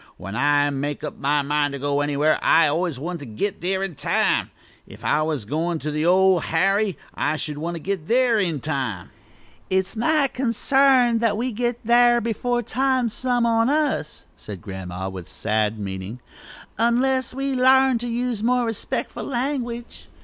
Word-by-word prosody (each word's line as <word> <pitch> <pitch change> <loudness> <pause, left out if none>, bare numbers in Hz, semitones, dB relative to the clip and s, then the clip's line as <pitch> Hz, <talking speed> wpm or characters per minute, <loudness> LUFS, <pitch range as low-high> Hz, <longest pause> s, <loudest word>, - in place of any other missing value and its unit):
When 95 +3 -7
I 145 +2 +2
make 145 +1 -3
up 150 - -6
my 145 +1 +1
mind 145 0 0
to - - -3
go 145 +1 0
anywhere 145 +1 +1
I 165 - +5
always 160 0 0
want 170 +5 -5
to 145 - -8
git 150 - -3
there 190 +2 -1
in 195 -3 -3
time. - - +1 0.4
If - - -12
I 155 - +2
was 155 -8 -2
goin' 165 +8 -1
to 150 -1 -4
the 150 +2 0
Old 185 -1 +4
Harry, 195 +4 +1 0.2
I 150 +1 -1
should 150 -1 -4
want 170 +2 -3
to - - -5
git 185 -2 -4
there 240 -2 +3
in 170 -8 -1
time." 125 - -3 0.6
"It's 190 +3 0
my 285 +5 +2
consarn 255 -1 +2
that 225 -3 +1
we 245 +3 -1
shall 230 - -8
git 240 +1 -1
thar' 240 +1 +5
before 240 +2 -1
time, 260 0 0
some 245 +1 0
on 230 +1 +2
us," 290 - -1
said 100 -3 -9
Grandma, 95 -1 -6
with 95 -3 -8
sad 110 0 -1
meaning, 95 +3 -6 0.6
"unless 250 +2 +1
we 275 0 -2
larn 260 -1 +4
to 240 - -4
use 240 -2 -2
more 245 +1 +2
respec'ful 225 -2 -4
language." 240 -2 -4
190 Hz, 175 wpm, -23 LUFS, 145-240 Hz, 0.6 s, I